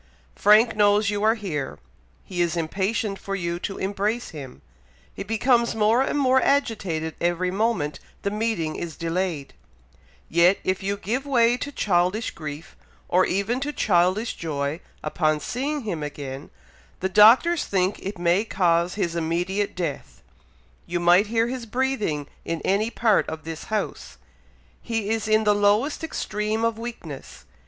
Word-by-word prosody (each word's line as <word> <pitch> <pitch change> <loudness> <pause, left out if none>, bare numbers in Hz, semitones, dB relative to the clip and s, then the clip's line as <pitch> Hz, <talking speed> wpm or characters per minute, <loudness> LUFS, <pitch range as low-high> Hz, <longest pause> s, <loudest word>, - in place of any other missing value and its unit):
Frank 220 +2 +5
knows 205 0 +3
you 205 0 -2
are 220 +1 +4
here; 150 - -4 0.5
he 180 -2 -3
is 170 0 0
impatient 195 +5 -1
for 195 - -4
you 170 -2 -3
to 195 - -5
embrace 205 +5 -2
him; 140 -6 -10 0.5
he - - -8
becomes 235 +3 +2
more 220 +3 +3
and 270 - 0
more 260 -2 +4
agitated 195 - 0
every 175 +1 0
moment 195 -7 -1 0.2
the 200 - -1
meeting 210 -7 -1
is 165 -3 -5
delayed; 165 -3 -2 0.7
yet 170 +3 +4
if 185 0 -1
you 200 +1 -2
give 245 +8 -3
way 240 -3 +4
to 285 +3 -5
childish 195 -1 +1
grief, 150 0 -8 0.3
or 185 +1 +3
even 200 +7 0
to 285 +2 -2
childish 190 0 +2
joy, 145 -1 -3 0.2
upon 155 0 +1
seeing 280 - -3
him 190 -9 -4
again, 145 -1 -6 0.5
the 190 - 0
Doctors 230 - +6
think 190 0 0
it 195 +1 -6
may 175 +3 +2
cause 175 -4 +1
his 175 -5 -1
immediate 175 +5 -1
death. 170 -6 -5 0.6
You 175 0 -1
might 175 +4 +5
hear 225 +1 +1
his 245 -1 -5
breathing 220 - -1 0.2
in 165 -1 -3
any 205 +4 +1
part 225 -3 +2
of 160 -1 -6
this 160 -1 -7
house. 215 -1 -4 0.6
He 225 -3 -2
is 225 -1 -1
in 215 0 +3
the 210 -1 +4
lowest 205 +10 +2
extreme 215 -7 -2
of 230 -1 -1
weakness! 225 - -8
200 Hz, 150 wpm, -24 LUFS, 170-225 Hz, 0.7 s, Doctors